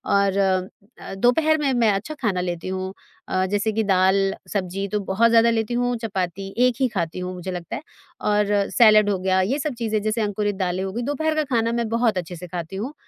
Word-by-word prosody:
और 200 Hz, -1 st, +2 dB, 0.6 s
अ, -, -, -8 dB
दोपहर 305 Hz, +10 st, +3 dB
में 290 Hz, -3 st, 0 dB
मैं 230 Hz, -3 st, +3 dB
अच्छा 200 Hz, +10 st, -3 dB
खाना 200 Hz, -7 st, 0 dB
लेती 175 Hz, -1 st, -4 dB
हूँ 190 Hz, 0 st, -4 dB, 0.3 s
अ, 185 Hz, 0 st, 0 dB
जैसे 205 Hz, +2 st, +1 dB
कि 220 Hz, +1 st, 0 dB
दाल, 195 Hz, 0 st, +3 dB, 0.2 s
सब्ज़ी 195 Hz, 0 st, -2 dB
तो 210 Hz, -, 0 dB
बहुत 200 Hz, +4 st, +2 dB
ज़्यादा 230 Hz, 0 st, +5 dB
लेती 225 Hz, 0 st, 0 dB
हूँ, 245 Hz, 0 st, 0 dB
चपाती 195 Hz, -3 st, -4 dB
1 250 Hz, -, 0 dB
ही 260 Hz, -, +3 dB
खाती 175 Hz, -6 st, -3 dB
हूँ 180 Hz, 0 st, -4 dB
मुझे 180 Hz, +1 st, -6 dB
लगता 175 Hz, -2 st, -5 dB
है, -, -, -6 dB, 0.4 s
और 210 Hz, 0 st, +2 dB, 0.2 s
सलाद 215 Hz, -3 st, +6 dB
हो 200 Hz, -, +1 dB
गया। 185 Hz, 0 st, +1 dB
ये 245 Hz, +10 st, 0 dB
सब 300 Hz, 0 st, -2 dB
चीज़ें, 220 Hz, -2 st, 0 dB
जैसे 215 Hz, +2 st, -1 dB
अंकुरित 205 Hz, -1 st, -1 dB
दालें 185 Hz, -1 st, -1 dB
हो 195 Hz, -, -3 dB
गई, 235 Hz, -, -3 dB
दोपहर 290 Hz, +5 st, -1 dB
का 310 Hz, -, +1 dB
खाना 230 Hz, 0 st, +2 dB
मैं 235 Hz, -1 st, -1 dB
बहुत 230 Hz, -2 st, +1 dB
अच्छे 180 Hz, 0 st, -4 dB
से 180 Hz, +2 st, -9 dB
खाती 170 Hz, +1 st, -6 dB
हूँ, 235 Hz, +10 st, -4 dB
205 Hz, 220 wpm, -23 LUFS, 185-230 Hz, 0.6 s, सलाद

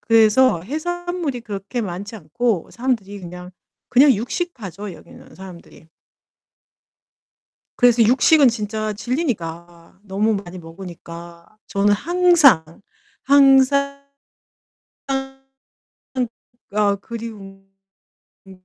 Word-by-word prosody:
그래서 225 Hz, -2 st, +4 dB
해산물이 330 Hz, -, -4 dB
그렇게 205 Hz, +2 st, -5 dB
많지 200 Hz, +1 st, -6 dB
않고 220 Hz, +1 st, -2 dB
사람들이 220 Hz, -5 st, -3 dB
그냥 180 Hz, 0 st, -9 dB, 0.4 s
그냥 270 Hz, +2 st, +6 dB
육식파죠 210 Hz, -, -5 dB
여기는 155 Hz, -, -15 dB
사람들이. 180 Hz, -3 st, -13 dB, 1.9 s
그래서 240 Hz, -2 st, +5 dB
육식은 265 Hz, +4 st, +5 dB
진짜 215 Hz, -1 st, -3 dB
질리니까 175 Hz, -, -5 dB
너무 210 Hz, +2 st, 0 dB
많이 185 Hz, -2 st, -7 dB
먹으니까 170 Hz, +1 st, -11 dB
저는 205 Hz, +1 st, +2 dB
항상, 325 Hz, -, +4 dB, 0.6 s
항상, 280 Hz, 0 st, +4 dB, 1.0 s
항상 270 Hz, 0 st, -7 dB, 1.0 s
아 205 Hz, -1 st, +2 dB
그리운 200 Hz, -3 st, -9 dB, 0.8 s
음 185 Hz, -1 st, -16 dB
215 Hz, 210 characters per minute, -20 LUFS, 190-270 Hz, 1.9 s, 그냥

